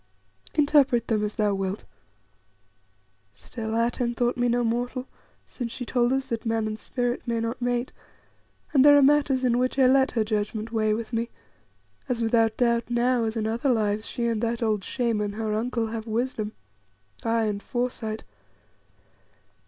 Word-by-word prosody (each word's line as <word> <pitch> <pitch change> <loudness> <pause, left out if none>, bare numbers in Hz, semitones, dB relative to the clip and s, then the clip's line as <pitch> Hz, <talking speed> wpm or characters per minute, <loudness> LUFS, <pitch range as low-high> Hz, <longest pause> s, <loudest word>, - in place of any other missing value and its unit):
Interpret 285 -5 +3
them 215 -2 +1
as 210 0 -3
thou 210 -2 +1
wilt. 195 +1 -3 1.5
Still, 220 - -6
Atene 235 +1 0
thought 240 +1 +1
me 245 0 +1
no 240 +1 +2
mortal, 245 +3 -2 0.4
since 240 -3 -6
she 245 - -5
told 240 0 +1
us 265 0 0
that 230 -1 -3
man 225 -1 0
and 215 0 -4
spirit 245 0 -2
may 230 -1 0
not 230 +2 -3
mate; 245 0 -1 0.8
and 270 -3 +6
there 290 0 +8
are 285 - +6
matters 280 -2 +3
in 245 -1 +2
which 255 +1 0
I 265 - +5
let 265 +1 +4
her 225 -3 +2
judgment 215 +1 -2
weigh 215 -2 +1
with 230 +1 -6
me, 230 +1 -1 0.8
as 245 -2 0
without 225 -1 +2
doubt 235 -1 +1
now, 240 0 +2
as 220 +1 -2
in 215 - -1
other 230 +5 0
lives, 215 -3 +1
she 240 - -3
and 230 -2 0
that 235 0 -1
old 215 -3 0
Shaman, 215 -4 -1
her 215 0 -2
uncle, 230 +1 -1
have 225 0 -5
wisdom, 220 -1 -2 0.7
aye, 230 0 +1
and 205 -1 -2
foresight. 240 -3 -3
235 Hz, 170 wpm, -26 LUFS, 220-245 Hz, 1.5 s, there